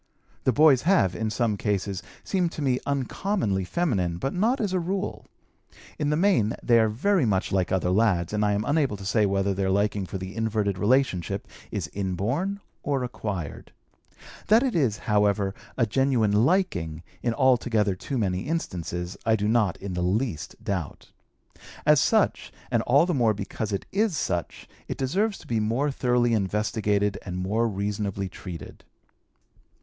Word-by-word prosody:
The 130 - +5
boys 140 0 +5
have, 165 - +3
in 110 +2 -1
some 110 -2 0
cases, 100 -2 -1 0.2
seemed 180 -3 0
to 150 - -4
me 130 -2 +1
uncommonly 140 - -1
feminine, 95 - 0
but 135 +10 -2
not 225 +8 +1
as 205 -4 -1
a 185 - +2
rule. 190 +3 -3 0.7
In 145 -1 0
the 150 - +2
main, 170 - +2
they 115 -1 +5
are 110 -1 +3
very 170 - +1
much 100 -5 0
like 95 -2 +1
other 90 -1 +1
lads, 95 -4 +2
and 105 0 +1
I 105 0 +2
am 105 +1 -1
unable 145 -7 +1
to 100 - -9
say 105 +1 +2
whether 100 0 +1
their 95 0 -1
liking 100 0 0
for 95 - -4
the 95 +1 -7
inverted 110 -4 -1
relationship 105 - +1 0.2
is - - -3
inborn 115 - -2 0.2
or 140 -3 -1
acquired. 100 - -5 0.7
That 220 +5 +5
it 260 -3 0
is, 130 -10 +2
however, 105 -2 +2 0.2
a 120 - +3
genuine 115 -3 +2
liking, 90 - 0 0.2
in 115 -2 0
altogether 120 -6 +2
too 130 +8 -4
many 95 -1 -1
instances, 90 - -3
I 110 0 +3
do 105 -1 -1
not, 110 -5 +2
in 100 -1 -6
the 90 - -2
least, 90 - -1
doubt. 95 -8 -4 0.7
As - - +6
such, - - +1 0.2
and - - +2
all 140 +6 +5
the 180 - 0
more 115 -6 +2
because 105 +1 -4
it 100 - -2
is 205 -4 +1
such, 85 -8 -3 0.2
it - - -4
deserves 195 +11 0
to - - -15
be 115 -2 0
more 120 +7 0
thoroughly 125 -2 +1
investigated 105 -1 0
and 90 -2 -5
more 105 +6 0
reasonably 100 -1 -2
treated. 90 -1 -9
110 Hz, 165 wpm, -26 LUFS, 95-135 Hz, 0.7 s, As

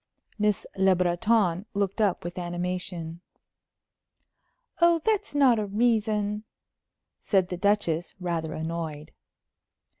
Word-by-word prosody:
Miss 210 -1 +1
Le 190 -1 +4
Breton 180 +1 +1
looked 200 +1 0
up 200 -4 +1
with 175 +1 -5
animation. 175 -1 -4 1.6
"Oh, 340 -1 +5
that's 420 -6 0
not 260 -5 +5
a 210 - -2
reason," 210 -1 +1 0.8
said 190 -3 +1
the 180 - -4
Duchess, 180 -4 0
rather 165 -3 -2
annoyed. 160 -2 -5
190 Hz, 100 wpm, -27 LUFS, 175-210 Hz, 1.6 s, Oh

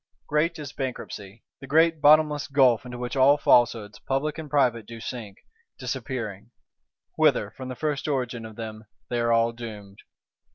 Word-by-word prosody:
Great 165 +3 0
is 145 -4 -7
Bankruptcy: 115 -5 -6 0.2
the 135 - -10
great 160 +2 +3
bottomless 150 -1 +5
gulf 130 -4 +3
into 125 0 -7
which 125 +1 -4
all 135 +2 +5
Falsehoods, 115 -6 +2
public 150 +4 -2
and 155 -2 -7
private, 125 -6 +1
do 115 -1 -9
sink, 115 -4 -7 0.4
disappearing; 110 -5 -5 0.7
whither, - - +3
from 130 -1 -8
the 130 - -5
first 150 +1 -2
origin 125 -5 -2
of 110 -1 -9
them, 110 -1 -7 0.3
they 120 -1 0
were 115 0 +1
all 115 0 +3
doomed. 105 -4 -9
125 Hz, 160 wpm, -25 LUFS, 115-145 Hz, 0.7 s, bottomless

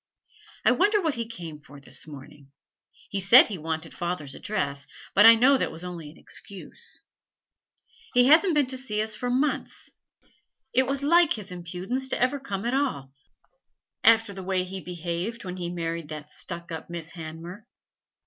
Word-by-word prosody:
'I - - +7
wonder 415 +3 +3
what 320 -6 0
he 230 -2 -4
came 170 -9 -8
for 145 -1 -14
this 135 +2 -6
morning. 140 -1 -12 0.6
He 200 - -1
said 215 +8 +8
he 195 -5 -5
wanted 160 +1 -4
father's 170 -5 -3
address, 140 -9 -2 0.3
but 205 +3 +8
I 230 - +10
know 260 +4 +5
that - - -1
was 160 +2 -9
only 170 -4 -7
an 155 - -16
excuse. 205 - -8 1.1
He 245 0 +7
hasn't 320 +5 +6
been 295 -2 +4
to 260 +1 -4
see 220 -5 -2
us 220 0 -4
for 245 +3 -3
months. 270 +4 -1 0.8
It 260 +1 +3
was 275 +1 -1
like 335 +2 +5
his 210 -4 -7
impudence 180 +9 -4
to - - 0
ever 255 +3 +2
come 205 -6 -4
at 240 - 0
all, 250 - -1 0.9
after 225 -2 +5
the 190 - -7
way 185 0 0
he 190 +1 -6
behaved 180 +6 -4
when 180 0 -5
he 175 -1 -3
married 165 -2 -4
that 150 -1 -8
stuck 170 -1 -7
up 160 0 -6
Miss 170 -1 -6
Hanmer.' 170 +4 -8
190 Hz, 175 wpm, -26 LUFS, 165-250 Hz, 1.1 s, I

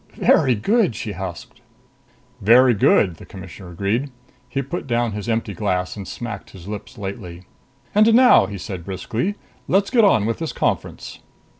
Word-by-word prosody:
"Very 130 -2 +4
good!" 195 - +1
she 110 - -5
husked. 95 -2 -8 0.8
"Very 120 +4 +6
good," 95 -4 +3
the - - -12
Commissioner 95 -1 -10
agreed. 100 +10 -1 0.4
He 135 +2 -2
put 140 +3 -5
down 120 -1 0
his 105 +2 -5
empty 115 0 -1
glass 90 -4 -2
and 100 -3 -7
smacked 110 +1 -7
his 95 -1 -13
lips 105 -1 -7
lightly. 95 -3 -7 0.5
"And 215 +2 +5
now," 250 - +6
he 100 0 -6
said 90 -1 -6
briskly, 110 - -3 0.3
"let's 195 +1 +2
get 240 -3 +4
on 110 - +4
with 115 +1 -2
this 165 -1 -4
conference." - - -3
105 Hz, 160 wpm, -21 LUFS, 95-130 Hz, 0.8 s, Very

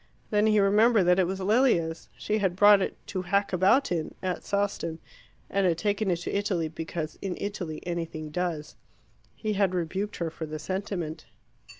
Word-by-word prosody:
Then 210 0 +3
he 215 -1 +4
remembered 210 +2 +5
that 180 +1 +4
it 185 - +3
was 190 +1 -3
Lilia's. 190 -6 +2
She 215 +1 -1
had 190 -3 0
brought 205 +1 +7
it - - -2
"to 185 - -3
hack 200 +2 0
about 195 +9 +3
in" 165 -3 -2
at 185 -1 -2
Sawston, 200 -5 -1 0.5
and 195 -1 +1
had 165 -2 +1
taken 205 +2 0
it 175 - +3
to - - -3
Italy 190 -5 0
because 160 -1 -5
"in 190 -2 -3
Italy 180 -6 -4
anything 165 -3 -4
does." 170 -3 -3 0.6
He 215 -1 -2
had 195 -2 +1
rebuked 190 +4 -2
her 170 -2 -3
for 160 0 -6
the 155 0 -5
sentiment. 175 -2 -4
185 Hz, 180 wpm, -27 LUFS, 165-205 Hz, 0.6 s, brought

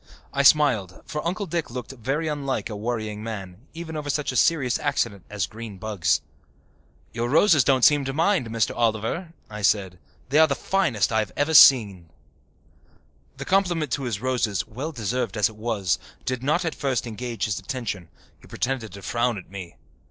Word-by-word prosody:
I 140 - +2
smiled, 130 -11 +3
for 150 - -4
Uncle 200 +4 -2
Dick 170 -2 -3
looked 125 0 -6
very 135 +6 -2
unlike 140 -5 -2
a - - -4
worrying 110 -1 -3
man, 105 0 -7
even 165 -1 -6
over 150 -1 -4
such 145 0 -1
a - - -7
serious 130 -2 +2
accident 100 -6 -1
as 105 -3 -1
green 110 -3 -9
bugs. 95 -7 0 0.9
"Your 120 +1 -2
roses 155 0 +5
don't 130 -3 +4
seem 145 -2 +5
to 135 - -2
mind, 165 - +1
Mr. 110 -1 0
Oliver," 115 - -1 0.2
I 105 0 -8
said. 95 -3 +1 0.3
"They 145 +4 +4
are 160 - +7
the 140 - 0
finest 135 - 0
I 110 - +2
have 105 -2 -2
ever 145 +2 +1
seen." 105 - +7 1.3
The - - -6
compliment 175 -5 +1
to 140 - -1
his 110 -4 -3
roses, 125 -6 0
well 135 +9 -5
deserved 115 -3 -2
as 105 -1 +3
it 110 - -14
was, 105 -6 -1 0.3
did 130 -1 -2
not 155 +7 +1
at 165 - -1
first 130 -4 -1
engage 115 -1 -4
his 105 -2 -2
attention. 105 - -5 0.3
He - - -18
pretended 125 -4 -3
to 100 -1 -10
frown 120 +1 0
at 95 - -11
me. 95 -3 -8
120 Hz, 180 wpm, -24 LUFS, 105-145 Hz, 1.3 s, are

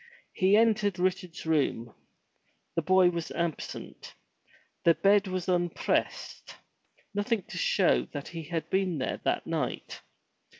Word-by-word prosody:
He 195 +1 +4
entered 210 -4 +3
Richard's 180 -2 -2
room. 140 -7 0 0.8
The 165 - +2
boy 185 +2 +4
was 170 -2 -4
absent. 170 -2 -5 0.7
The 170 -1 +5
bed 200 +4 +4
was 185 -1 -3
unpressed, 175 -2 -1 0.6
nothing 205 0 0
to - - -9
show 60 0 +3
that 140 - -7
he 165 -2 -6
had 165 +1 -3
been 190 -3 +1
there 130 - -3
that - - 0
night. - - -3
180 Hz, 125 wpm, -29 LUFS, 165-195 Hz, 0.8 s, The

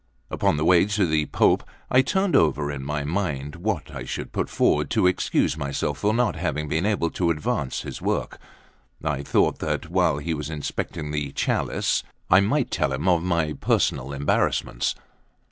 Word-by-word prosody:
Upon - - +1
the 75 - 0
way 90 +1 +5
to 105 -1 +1
the 80 -2 +1
Pope, - - +3 0.3
I 130 - +6
turned 190 +7 +1
over 75 -2 +3
in 70 -2 -5
my 75 +1 -2
mind 75 -3 -2
what 90 -4 -2
I - - -5
should - - -5
put - - -2
forward - - +2
to - - +2
excuse 90 -5 +2
myself 70 -3 -2
for 105 - +2
not 115 -3 +1
having 75 +2 -2
been 80 +6 0
able 90 -6 0
to 85 -2 0
advance 75 -4 -1
his - - -7
work. - - -2 0.6
I 75 -2 -1
thought 70 - +1
that 80 - -3
while 90 -5 +2
he 80 +3 -2
was 75 -1 -4
inspecting 75 0 -4
the 75 -2 -2
chalice, - - 0 0.3
I 95 - +8
might 120 +7 +1
tell 70 -4 0
him 70 +7 -2
of 85 -3 +4
my 85 -3 0
personal 70 -1 0
embarrassments. 70 -3 0
80 Hz, 180 wpm, -24 LUFS, 75-90 Hz, 0.6 s, I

